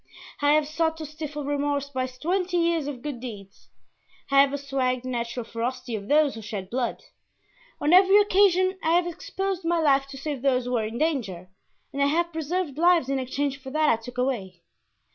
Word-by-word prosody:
I 290 0 +4
have 305 -1 +3
sought 320 +1 0
to 315 - -6
stifle 300 -1 -6
remorse 285 0 -1
by 255 -1 -1
twenty 355 +8 -1
years 335 -3 +1
of 265 -4 -6
good 290 -5 -4
deeds; 205 -6 -10 0.6
I 275 0 +7
have 275 -1 +3
assuaged 270 -3 -1
the 255 - -5
natural 235 0 -3
ferocity 245 +1 -4
of 200 -1 -6
those 295 -1 +4
who 225 - -8
shed 205 -3 -6
blood; 245 -1 -2 0.8
on 300 +3 +2
every 385 +2 +7
occasion 375 -2 +3
I 320 - +2
have 350 0 +3
exposed 380 +2 -4
my 340 +1 +1
life 275 -3 +3
to 275 0 -9
save 280 -2 -4
those 255 -2 +1
who 250 - -4
were 230 -3 +1
in 225 +2 -5
danger, 220 - -2 0.4
and 280 - -2
I 280 - +4
have 340 +3 0
preserved 320 -1 -2
lives 340 -5 +4
in 275 -1 0
exchange 275 +2 -2
for 265 - -8
that 310 +2 +2
I - - +5
took 245 +2 -10
away. 200 -9 -2
280 Hz, 200 wpm, -25 LUFS, 250-320 Hz, 0.8 s, I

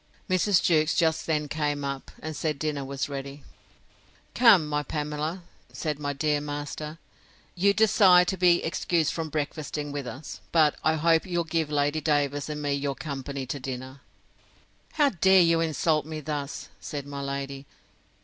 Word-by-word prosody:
Mrs. 185 0 +3
Jewkes 155 -1 +3
just 160 -2 +1
then 150 -2 0
came 145 -1 -2
up, 140 -1 -5
and 155 0 -4
said 150 0 -2
dinner 145 -1 -2
was 135 0 -3
ready. 140 0 -7 0.9
Come, 220 -10 +6
my 150 0 0
Pamela, 150 +4 -3 0.3
said 150 -3 -3
my 145 -1 -2
dear 150 +1 0
master; 145 +1 -5 0.6
you 195 +3 +3
desired 200 -4 +5
to 190 - -1
be 175 -1 +4
excused 165 -1 0
from 160 -1 -3
breakfasting 150 0 -3
with 140 -3 -4
us; 140 +5 -8
but 155 -3 +4
I 160 0 +3
hope 165 +2 +2
you'll 175 -2 0
give 160 -2 -1
Lady 145 +1 0
Davers 145 -1 0
and 150 0 -4
me 145 -1 0
your 140 0 -2
company 140 -2 -5
to 140 +2 -4
dinner. 130 +1 -7 0.9
How 295 -2 +4
dare 190 -2 +5
you 165 -1 +3
insult 155 -1 +1
me 155 -1 -5
thus? 150 -1 -5
said 145 -2 -6
my 140 0 -6
lady. 140 0 -5
150 Hz, 160 wpm, -27 LUFS, 140-165 Hz, 0.9 s, Come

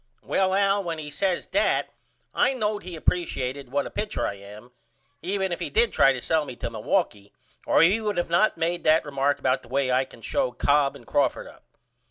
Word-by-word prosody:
Well 190 0 +1
Al 200 0 +2
when 165 -2 -4
he 150 -1 -7
says 185 +3 -1
that - - +1 0.4
I 270 - +2
knowed 210 -3 -1
he 180 -1 -8
appresiated 140 -6 -2
what 140 +1 0
a - - -7
pitcher 210 - -2
I - - -2
am 105 +4 -13 0.5
even 190 +2 -2
if 175 - -3
he - - -3
did 460 +1 +2
try 135 - +5
to 130 - -3
sell 160 +5 +1
me 130 -4 -8
to 115 - -5
Milwaukee 105 - -2 0.4
or - - +5
he 195 +7 +4
would 210 -1 -2
not 175 +6 +3
of - - -30
made 170 +1 -1
that 160 +1 +4
remark 140 0 0
about 130 -1 0
the - - -17
way 135 0 0
I 130 +1 +2
can 120 - -16
show 125 - -1
Cobb 140 +2 +2
and - - -14
Crawford - - 0
up. - - -16
155 Hz, 215 wpm, -25 LUFS, 130-190 Hz, 0.5 s, try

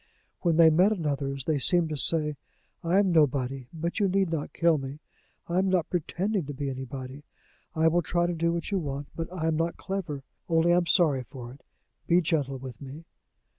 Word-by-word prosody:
When 170 -3 +2
they 165 -1 +7
met 180 +6 +4
another's, 140 -7 -2
they 155 -3 +1
seemed 175 +3 +4
to 155 - -3
say: 150 +1 +2 0.5
"I 170 +3 +2
am 200 -2 +3
nobody; 135 -5 +1
but 170 +4 -3
you 205 - +3
need 190 -2 +1
not 155 -3 -3
kill 165 -2 +2
me; 135 +1 -7 0.5
I 175 +2 +1
am 190 0 +1
not 185 -3 0
pretending 180 +2 -1
to 145 - -6
be 140 0 -3
anybody. 130 +1 -7 0.5
I 160 0 +3
will 170 +2 +3
try 175 +2 0
to 175 - -1
do 170 0 0
what 170 +4 -3
you 195 - +1
want, 140 -3 -5
but 165 +1 -5
I 175 -3 -4
am 160 -1 +1
not 165 +1 -1
clever. 170 -8 -4 0.3
Only 165 +1 +3
I - - +4
am 175 -1 +1
sorry 155 -9 +3
for 125 -1 -10
it. 135 - -15 0.5
Be 175 +1 +5
gentle 150 -5 -1
with 130 -3 -9
me." 140 +4 -9
160 Hz, 210 wpm, -27 LUFS, 140-175 Hz, 0.5 s, they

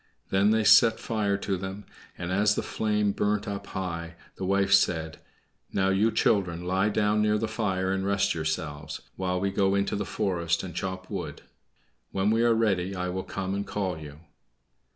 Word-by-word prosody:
Then 95 +2 +4
they 110 0 +3
set 110 +1 +6
fire 105 -3 0
to 100 -1 -2
them; 95 +2 -6 0.3
and 85 - -4
as 105 +2 +3
the - - -1
flame 105 -1 0
burnt 105 +2 0
up 100 -1 -5
high, 85 -3 -5 0.2
the 95 - -4
wife 100 +1 +2
said, 80 -5 +2 0.5
"Now, 95 0 +1
you 100 +4 +3
children, 90 -6 +1
lie 95 +3 +1
down 105 0 +2
near 105 0 +3
the 110 - -1
fire, 95 -4 -1
and 95 0 -1
rest 100 0 +1
yourselves, 80 -1 -4
while 90 -1 -1
we 100 +1 0
go 95 0 +2
into 100 0 0
the 105 - -1
forest 85 -4 -1
and 90 -2 -6
chop 95 +2 -5
wood. 85 -7 -5 0.7
When 95 +2 +1
we 115 +1 +2
are 120 -1 +4
ready 100 -4 +1
I 90 0 -2
will 95 +1 -2
come 95 0 -4
and 100 0 -1
call 95 -5 -2
you." 75 0 -10
95 Hz, 185 wpm, -27 LUFS, 90-105 Hz, 0.7 s, set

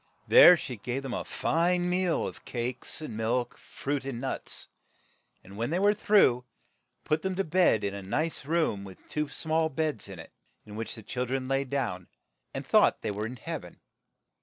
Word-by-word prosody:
There 180 - +9
she 125 -6 -6
gave 125 +6 -4
them 135 -2 -4
a - - -2
fine 175 +2 +1
meal 180 -1 +1
of - - -7
milk, - - -21
cakes, 125 +5 -4 0.6
fruit, 140 0 -4
and 135 -3 -4
nuts; 135 +1 -4 0.8
and 95 - -13
when 115 +2 -1
they 170 - 0
were 205 +2 +4
through, 200 - +4 0.6
put 155 - 0
them 190 -1 -2
to 195 - +1
bed 165 - +3
in 100 0 -1
a 100 - -6
nice 155 +14 -2
room 150 -10 0
with 95 -1 -10
two 150 -1 -2
small 160 0 0
beds 155 -6 -2
in 95 - -8
it, 80 - -11 0.3
in 105 -1 -10
which 115 +2 -4
the 110 - -10
chil 125 +4 -3
dren 130 +1 -2
lay 135 +1 +1
down 120 -10 -2 0.4
and - - -5
thought - - +4
they - - -1
were 105 +2 -3
in 125 - -7
heav 115 - -5
en. - - -14
135 Hz, 190 wpm, -29 LUFS, 115-165 Hz, 0.8 s, There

